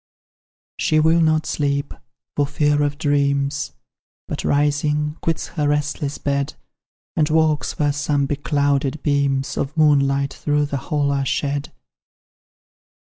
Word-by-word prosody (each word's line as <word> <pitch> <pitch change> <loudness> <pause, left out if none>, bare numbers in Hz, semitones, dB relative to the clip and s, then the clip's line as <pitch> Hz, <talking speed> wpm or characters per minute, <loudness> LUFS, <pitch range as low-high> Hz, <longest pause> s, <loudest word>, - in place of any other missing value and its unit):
She 155 - +2
will 160 +2 +4
not 155 -1 +2
sleep, 140 -1 -1 0.4
for 145 -1 +1
fear 145 +1 +1
of 145 0 0
dreams, 140 -3 0 0.5
But, - - -4
rising, 150 +1 +1
quits 165 -1 -2
her 150 -3 -1
restless 145 -1 -1
bed, 140 +1 -1 0.6
And 155 -1 +2
walks 155 -1 +1
where 145 -1 +1
some 145 -1 0
beclouded 145 0 0
beams 140 -2 0
Of 145 +3 -3
moonlight 140 -2 +3
through 150 +1 0
the 140 -1 -3
hall 145 -3 +1
are 140 -1 0
shed. 140 +1 -2
145 Hz, 125 wpm, -21 LUFS, 140-150 Hz, 0.6 s, will